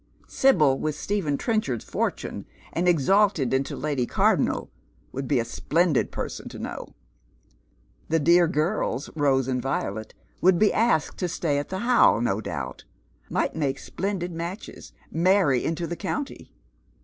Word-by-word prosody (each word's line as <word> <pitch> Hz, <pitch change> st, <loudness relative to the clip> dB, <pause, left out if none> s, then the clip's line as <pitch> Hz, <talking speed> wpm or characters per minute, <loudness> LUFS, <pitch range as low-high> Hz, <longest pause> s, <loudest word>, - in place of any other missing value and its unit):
Sibyl 155 Hz, -, +3 dB
with 155 Hz, -1 st, -2 dB
Stephen 160 Hz, -5 st, -1 dB
Trenchard's 215 Hz, -, -1 dB
fortune, -, -, -3 dB, 0.3 s
and 175 Hz, +2 st, 0 dB
exalt' 195 Hz, +5 st, +4 dB
li 130 Hz, -3 st, 0 dB
into 135 Hz, +1 st, -1 dB
Lady 140 Hz, -5 st, -1 dB
Cardonnel, -, -, +1 dB, 0.4 s
would 135 Hz, 0 st, -4 dB
be 140 Hz, -, +2 dB
a 115 Hz, -, -1 dB
splendid 160 Hz, +5 st, +1 dB
person -, -, -5 dB
to -, -, -9 dB
know. -, -, -7 dB, 1.1 s
Tlie 160 Hz, -1 st, +1 dB
dear 170 Hz, +2 st, +5 dB
girls, 155 Hz, -, -1 dB
Rose 135 Hz, -4 st, +2 dB
and 125 Hz, -1 st, -1 dB
Violet, 110 Hz, -5 st, -3 dB, 0.3 s
would 185 Hz, 0 st, +5 dB
be 210 Hz, +3 st, +3 dB
asked 225 Hz, -9 st, +1 dB
to 180 Hz, -, 0 dB
stay 160 Hz, -4 st, -1 dB
at 145 Hz, -, -5 dB
the 190 Hz, +1 st, -3 dB
Ho 245 Hz, 0 st, +5 dB
.v, 115 Hz, -, -1 dB
no 105 Hz, -1 st, 0 dB
doubt; 65 Hz, -, -5 dB, 0.5 s
might -, -, -1 dB
make 140 Hz, -4 st, -1 dB
splendid 185 Hz, +3 st, -3 dB
matches, 170 Hz, +5 st, -7 dB, 0.2 s
marry 170 Hz, -6 st, +3 dB
into 165 Hz, +1 st, -2 dB
the 170 Hz, -, -4 dB
coun'iy. 275 Hz, -, -4 dB
160 Hz, 150 wpm, -25 LUFS, 135-185 Hz, 1.1 s, dear